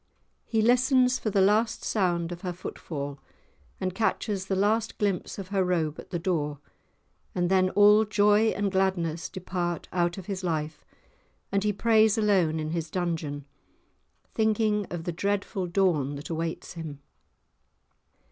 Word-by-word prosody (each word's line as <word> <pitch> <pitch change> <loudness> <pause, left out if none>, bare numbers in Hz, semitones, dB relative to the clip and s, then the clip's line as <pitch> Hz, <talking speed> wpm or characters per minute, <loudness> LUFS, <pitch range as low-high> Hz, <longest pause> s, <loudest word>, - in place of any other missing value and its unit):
He 220 -2 +1
listens 250 +1 +4
for 215 - -1
the 200 -1 +2
last 215 +3 +2
sound 175 -4 0
of 175 0 -7
her 180 -2 -3
footfall, 145 -5 -6 0.6
and 185 -1 -2
catches 205 -1 -1
the 190 - 0
last 215 +3 +1
glimpse 200 -4 -1
of 190 -2 -7
her 195 -2 +1
robe 165 -4 -1
at - - -10
the 175 - -2
door, 160 -4 -1 0.8
and 175 0 0
then 185 -1 +4
all 210 +2 +6
joy 210 +1 +3
and 205 -2 0
gladness 180 -4 0
depart 175 -3 -3
out 175 0 0
of 190 - -7
his 195 -1 -4
life, 155 -3 -2 0.7
and 200 0 +1
he 210 - +2
prays 220 +1 +3
alone 190 -7 +2
in 155 0 -3
his 165 -1 -3
dungeon, 160 -5 -3 0.9
thinking 215 -2 +1
of 175 -2 -5
the 175 - -2
dreadful 200 +1 -2
dawn 170 -7 +1
that 145 +4 -7
awaits 165 0 -4
him. 160 -4 -7
185 Hz, 150 wpm, -27 LUFS, 170-210 Hz, 0.9 s, all